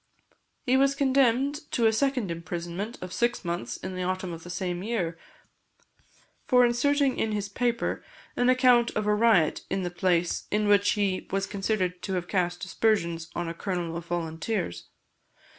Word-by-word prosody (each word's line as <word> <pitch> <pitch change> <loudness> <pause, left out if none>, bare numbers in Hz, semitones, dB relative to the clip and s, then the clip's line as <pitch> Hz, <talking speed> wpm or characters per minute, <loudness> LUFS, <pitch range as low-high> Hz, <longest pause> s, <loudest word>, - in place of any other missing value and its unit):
He 260 +1 +3
was 275 +1 +3
condemned 275 +2 +2
to 235 - +2
a 220 - +4
second 250 -5 0
imprisonment 175 +6 -5
of 185 - -7
six 240 -4 0
months 170 -9 -3
in 185 - -6
the 185 - -4
autumn 185 -1 -2
of 165 - -8
the 175 - -10
same 180 0 -3
year, 190 -6 -2 1.3
for 250 -2 +6
inserting 275 +3 +2
in 220 -1 0
his 205 -1 -2
paper 235 +3 -1 0.3
an 245 +1 +2
account 250 -2 +5
of 215 - 0
a 210 - +3
riot 210 -7 +3
in 195 - -1
the 175 - -3
place, 175 -1 0
in 210 0 +1
which 205 0 +4
he 200 -3 -1
was 195 0 0
considered 195 -3 -2
to 190 - -4
have 175 -1 -3
cast 180 -1 -1
aspersions 170 -4 0
on 175 -1 -2
a 165 - -3
colonel 175 -2 -3
of 170 0 -6
volunteers. 165 - -3
195 Hz, 170 wpm, -27 LUFS, 175-235 Hz, 1.3 s, for